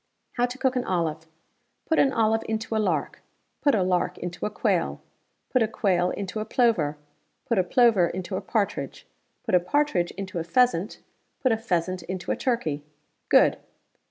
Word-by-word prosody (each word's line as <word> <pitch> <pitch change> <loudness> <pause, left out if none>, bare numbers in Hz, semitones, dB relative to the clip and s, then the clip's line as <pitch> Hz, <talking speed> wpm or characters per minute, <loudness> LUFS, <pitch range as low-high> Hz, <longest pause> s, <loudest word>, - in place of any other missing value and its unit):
"How 245 0 +1
to 250 +1 -8
cook 260 -1 +1
an 250 - 0
olive! 165 -4 -2 0.6
Put 320 - +2
an 275 - +4
olive 225 -2 +2
into 220 0 -2
a 220 - +2
lark, 170 -8 -1 0.4
put 285 -5 +4
a 195 - +2
lark 180 -1 0
into 175 +2 -4
a - - -3
quail; - - 0 0.5
put 255 - +3
a 225 - +3
quail 185 -5 +1
into 200 +3 -4
a - - -1
plover; 215 - +1 0.5
put 230 - +1
a - - +4
plover 220 -3 +4
into 185 +2 -4
a - - -2
partridge; 210 -4 -2 0.4
put - - -4
a 180 - +7
partridge 180 -2 +1
into 190 -3 -4
a - - -2
pheasant; 200 +1 +1 0.4
put 255 - +2
a - - +4
pheasant 185 -4 -1
into 180 +2 -4
a - - +1
turkey. 165 - -1 0.5
Good. - - +5
195 Hz, 180 wpm, -26 LUFS, 175-235 Hz, 0.6 s, a